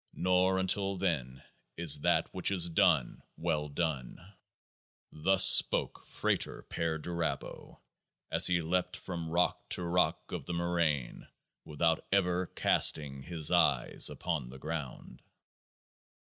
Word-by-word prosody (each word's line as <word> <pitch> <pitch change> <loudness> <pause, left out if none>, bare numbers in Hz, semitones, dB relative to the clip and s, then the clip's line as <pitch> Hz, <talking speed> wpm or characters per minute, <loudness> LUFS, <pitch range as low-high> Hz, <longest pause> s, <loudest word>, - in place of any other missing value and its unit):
Not 90 +1 +1
until 95 +1 -1
then 70 -9 -3 0.3
is 80 -3 +5
that - - 0
which - - 0
is 90 -3 +4
done 80 -5 +1 0.2
well 75 -3 -3
done. 70 -4 -4 0.9
Thus 95 +5 +4
spoke - - +3
FRATER - - -3
PERDURABO 85 +1 -5 0.5
as - - +6
he 85 -2 0
leapt 90 +3 -2
from 85 -3 -7
rock 85 +2 -1
to 90 - -3
rock 90 +1 -1
of - - -6
the 90 - -4
moraine 85 -6 -2 0.4
without 80 +2 -1
ever 90 -2 0
casting 70 -3 +2
his 80 0 +1
eyes - - +2
upon - - -5
the 65 - -12
ground. 75 -2 -8
85 Hz, 115 wpm, -30 LUFS, 75-90 Hz, 0.9 s, as